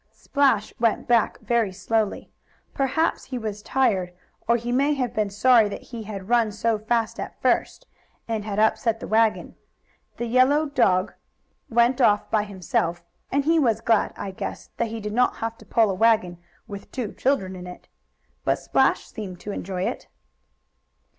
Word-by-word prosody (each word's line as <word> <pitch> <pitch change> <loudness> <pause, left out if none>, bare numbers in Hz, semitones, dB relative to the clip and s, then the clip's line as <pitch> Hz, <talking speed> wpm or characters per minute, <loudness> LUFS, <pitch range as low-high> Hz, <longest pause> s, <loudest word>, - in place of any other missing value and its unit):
Splash 275 -7 +1
went 230 -2 +1
back 235 -2 +2
very 230 -4 +1
slowly. 205 +3 -2 0.4
Perhaps 280 +5 0
he 260 - -5
was 215 -3 -5
tired, 195 -9 +1 0.4
or 235 +1 +4
he 240 +1 -4
may 280 +4 +2
have 255 -4 -2
been 215 -2 0
sorry 220 +1 +4
that - - -7
he 230 - -5
had 200 -3 -7
run 230 -2 +3
so 215 +1 0
fast 225 +1 -1
at - - -7
first, - - 0 0.4
and 220 -2 -2
had 205 -1 -4
upset 220 +1 +2
the - - -7
wagon. 220 0 +1 0.6
The 240 - -2
yellow 255 +6 +3
dog 195 -10 +2 0.6
went 240 +3 +3
off 210 -3 +3
by 210 -1 +2
himself, 175 -3 -2 0.3
and 280 +1 +1
he 325 +1 +4
was 230 -7 +2
glad, 225 -1 +2
I 195 - -5
guess, 185 - -7
that 235 - 0
he 225 0 -5
did 210 0 -5
not 250 +2 +2
have 225 0 -4
to - - -16
pull 225 -3 +3
a - - -1
wagon 215 -4 +2 0.3
with 200 -1 -9
two 240 -6 -4
children 195 -9 0
in 180 0 -8
it. 180 - -11 0.6
But - - +2
Splash - - +1
seemed 190 -5 -8
to 210 - -5
enjoy 185 -2 -4
it. - - -4
225 Hz, 175 wpm, -24 LUFS, 205-240 Hz, 0.6 s, or